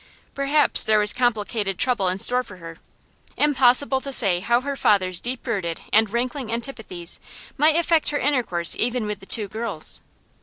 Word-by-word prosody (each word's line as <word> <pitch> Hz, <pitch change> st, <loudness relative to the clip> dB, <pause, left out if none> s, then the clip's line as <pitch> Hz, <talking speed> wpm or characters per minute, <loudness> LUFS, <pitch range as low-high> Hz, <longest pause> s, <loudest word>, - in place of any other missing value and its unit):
Perhaps 280 Hz, +2 st, +3 dB
there 215 Hz, 0 st, +2 dB
was 210 Hz, 0 st, +4 dB
complicated 215 Hz, -5 st, -2 dB
trouble 240 Hz, -7 st, 0 dB
in 180 Hz, +1 st, -2 dB
store 250 Hz, +5 st, +3 dB
for 205 Hz, -6 st, -13 dB
her; 165 Hz, -1 st, -12 dB, 0.6 s
impossible 265 Hz, -1 st, +3 dB
to 275 Hz, -, -3 dB
say 195 Hz, -9 st, +3 dB
how 235 Hz, +6 st, 0 dB
her 280 Hz, +1 st, -5 dB
father's 185 Hz, -8 st, +1 dB
deep 245 Hz, +1 st, -5 dB
rooted 190 Hz, -9 st, -4 dB
and 220 Hz, 0 st, +3 dB
rankling 245 Hz, +2 st, -4 dB
antipathies 225 Hz, -8 st, -4 dB, 0.4 s
might 305 Hz, +2 st, +2 dB
affect 335 Hz, -1 st, +1 dB
her 295 Hz, -, -2 dB
intercourse 240 Hz, -, +1 dB
even 240 Hz, -1 st, -1 dB
with 210 Hz, -1 st, -5 dB
the 195 Hz, -, -16 dB
two 215 Hz, -3 st, +4 dB
girls. 215 Hz, -5 st, -1 dB
235 Hz, 165 wpm, -22 LUFS, 195-265 Hz, 0.6 s, was